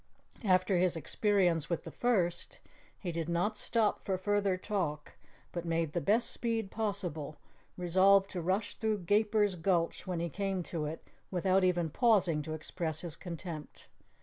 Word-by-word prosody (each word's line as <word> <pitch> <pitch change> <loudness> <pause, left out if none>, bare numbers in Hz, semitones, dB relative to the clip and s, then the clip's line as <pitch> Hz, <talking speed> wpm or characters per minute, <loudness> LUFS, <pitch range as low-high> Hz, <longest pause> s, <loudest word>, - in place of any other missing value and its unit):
After 185 -2 +3
his 180 -1 +2
experience 175 -2 +1
with 170 - -1
the - - -8
first, 190 -9 0 0.4
he 180 - -4
did 165 0 -3
not 180 +6 +1
stop 215 0 +1
for 190 -1 -1
further 200 0 +1
talk, 170 -7 -3 0.4
but 175 - -4
made 165 -2 -1
the 175 - 0
best 220 +6 +2
speed 225 -4 -2
possible, 180 -9 -3 0.4
resolved 190 +2 +5
to 180 - -3
rush 190 +5 -1
through 215 -2 0
Gaper's 210 +1 +3
Gulch 170 -1 0
when 180 -2 -2
he 170 - -1
came 190 +2 -2
to 165 -2 -3
it 155 +2 -5 0.3
without 185 +1 +2
even 175 -3 +2
pausing 190 - +3
to 155 +1 -5
express 160 0 -3
his 170 -4 -5
contempt. 170 -3 -8
185 Hz, 155 wpm, -32 LUFS, 165-205 Hz, 0.4 s, resolved